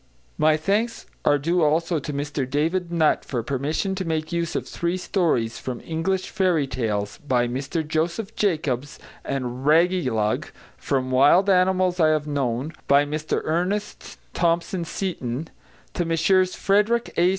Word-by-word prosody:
My 155 0 +4
thanks 210 +8 -1 0.2
are 145 - +5
due 170 +5 0
also 165 +2 +2
to 145 - -5
Mr 140 -2 -3
David 165 +5 0
Nutt 160 -3 +2
for 120 -4 -3
permission 145 - -1
to 190 0 -3
make 160 -1 -2
use 170 -1 -2
of - - -2
three 170 +1 -2
stories 160 - 0
from 125 -2 -5
English 175 +4 -2
Fairy 180 -7 +2
Tales, 105 -6 -3
by 125 -4 +1
Mr 135 +6 -3
Joseph 170 +7 -2
Jacobs, 150 - -1 0.3
and 130 -1 -4
Raggylug, 150 - +2 0.3
from 130 -2 -2
Wild 145 +10 +5
Animals 185 -1 +2
I 160 - +5
have 155 -1 +1
Known, 140 0 -2
by 140 +1 +5
Mr 150 +1 -2
Ernest 180 +6 -2 0.2
Thompson 170 +1 0
Seton; 160 -6 -4 0.4
to 175 - -1
Messrs 175 +3 +2
Frederick 210 +4 +1
A. 175 +1 +4
160 Hz, 145 wpm, -24 LUFS, 140-180 Hz, 0.4 s, are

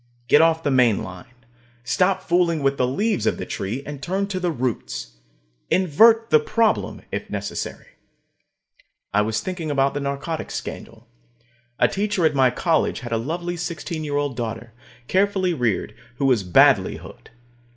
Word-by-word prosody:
Get 145 - +6
off 165 0 +3
the 145 - +1
main 125 -5 +3
line. 90 +7 -11 0.5
Stop 185 +9 +1
fooling 170 -3 +1
with 135 0 +1
the 125 - +2
leaves 205 - 0
of - - +1
the - - -5
tree, 110 +8 -4
and 145 -2 -7
turn 190 +7 -1
to 185 -2 -2
the 180 -1 0
roots. 115 - -4 0.5
Invert 220 +6 +4
the 155 - +7
problem, 220 +8 0
if - - -4
necessary. - - -5 1.3
I 105 - +4
was 110 +1 -1
thinking 180 -4 -4
about 140 -1 +1
the 145 - -2
narcotics 140 +3 -4
scandal. 115 +1 -8 0.7
A - - +4
teacher 200 -3 0
at 155 - +3
my 130 -2 +4
college 160 +6 0
had 120 -2 -7
a 115 - +1
lovely 170 +8 -3
sixteen 165 -1 -5
year 145 -1 -2
old 145 -3 -1
daughter, 115 -1 -5 0.3
carefully 190 -2 +1
reared, 120 - -1 0.2
who 140 - -1
was 125 -5 +3
badly 90 -2 +4
hooked. - - -13
145 Hz, 160 wpm, -22 LUFS, 125-180 Hz, 1.3 s, the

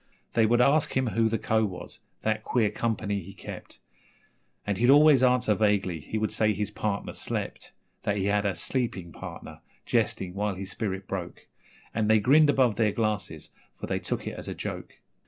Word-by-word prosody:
They 110 -1 +4
would 120 +2 +4
ask 140 +1 +3
him 130 - +2
who 115 +1 +2
the 115 - 0
Co. 110 +1 +1
was 95 -4 -5 0.2
that 110 0 0
queer 110 -4 +1
company 105 -3 -1
he 95 +2 -11
kept - - -9 0.9
And 100 -2 -1
he'd 120 +2 +3
always 145 -1 +7
answer 125 -3 +3
vaguely 100 -5 +1
he 95 +8 -5
would 110 -1 -1
say 110 -1 +2
his 105 +1 -3
partner 100 -2 -3
slept; - - -4 0.3
That 105 0 -1
he 95 - -1
had 100 0 +2
a 100 -3 0
'sleeping 105 -10 -2
partner' - - -9 0.3
jesting 90 -1 0
while 100 0 -1
his 95 0 -6
spirit 95 -2 -3
broke 90 -3 -6 0.5
And 110 -1 0
they 110 0 +6
grinned 145 +7 +5
above 130 -6 +3
their 110 -2 +3
glasses, 110 -1 -2 0.3
for - - -4
they - - -1
took - - -3
it - - -4
as - - -7
a - - -4
joke. - - -6
110 Hz, 190 wpm, -27 LUFS, 100-120 Hz, 0.9 s, always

